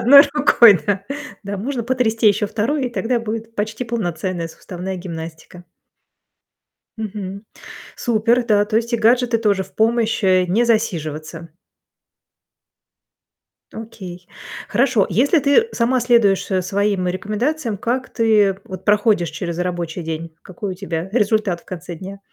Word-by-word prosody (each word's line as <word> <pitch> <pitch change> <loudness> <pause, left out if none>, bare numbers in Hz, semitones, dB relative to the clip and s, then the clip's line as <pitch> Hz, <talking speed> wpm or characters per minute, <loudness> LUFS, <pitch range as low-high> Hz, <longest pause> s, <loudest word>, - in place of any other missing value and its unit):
1 280 +4 +9
рукой, 235 - +6
да. 200 -1 0 0.4
Да, 200 0 -5
можно 240 +5 -3
потрясти 230 -3 +2
еще 210 +1 +1
2, 255 +7 -1
и - - -4
тогда 240 0 -1
будет 225 0 -5
почти 220 +3 -3
полноценная 180 -6 -3
суставная 185 +2 -7
гимнастика. 170 0 -8 1.3
Мгм. 200 -2 -6 0.5
Супер, 235 +1 +1
да. 205 -3 +3
То 215 +1 -1
есть 235 +1 -1
и - - +3
гаджеты 235 +1 +3
тоже 205 -4 +1
в 190 - -15
помощь, 225 0 +1
э- 185 -1 +4
не 220 +7 +2
засиживаться. 165 -7 -2 2.2
Окей. 185 -5 -9 0.4
Хорошо. 245 -4 +2
Если 275 - +3
ты 285 +11 +3
сама 250 +2 +1
следуешь, 215 -6 +3
э, 190 -1 +2
своим 195 0 0
рекомендациям, 215 - -2
как 250 +5 -2
ты 210 -4 +2
вот 185 -1 -9
проходишь 205 -5 +2
через 170 +2 -5
рабочий 175 -1 -3
день? 165 0 -5
Какой 185 +1 -6
у - - -6
тебя 180 -2 -4
результат 210 -5 +1
в - - -28
конце 175 -1 -7
дня? 195 +4 -9
210 Hz, 135 wpm, -20 LUFS, 185-235 Hz, 2.2 s, 1